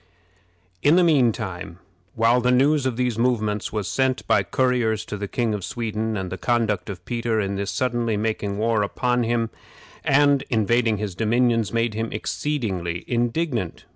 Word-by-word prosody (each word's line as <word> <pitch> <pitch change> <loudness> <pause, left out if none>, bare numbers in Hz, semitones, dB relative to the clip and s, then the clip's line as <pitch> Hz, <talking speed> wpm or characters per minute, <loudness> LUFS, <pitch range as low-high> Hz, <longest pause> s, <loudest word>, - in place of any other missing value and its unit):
In 150 +3 +5
the 180 - +5
mean 140 -8 +4 0.8
while 115 +2 +3
the 125 - +1
news 135 +2 +3
of 120 -3 -3
these 125 -3 0
movements 110 -4 0
was 105 -3 -2
sent 130 -1 0
by - - +3
couriers 125 -4 0
to - - -5
the 100 0 -4
King 115 +1 -1
of 105 -3 -4
Sweden, 110 -1 -3
and 95 -2 -4
the 95 - -5
conduct 110 -6 0
of 90 -3 -7
Peter 115 -2 -1
in 100 -1 -1
thus 100 0 -3
suddenly 120 -3 0
making 105 -2 -2
war 110 0 +1
upon 125 +4 0
him, 115 -1 0 0.5
and 140 0 +4
invading 115 -1 +2
his 105 -2 -4
dominions, 115 +2 +1
made 115 -1 0
him 110 +1 -3
exceedingly 100 - -3
indignant. 120 - -1
115 Hz, 165 wpm, -23 LUFS, 105-125 Hz, 0.8 s, In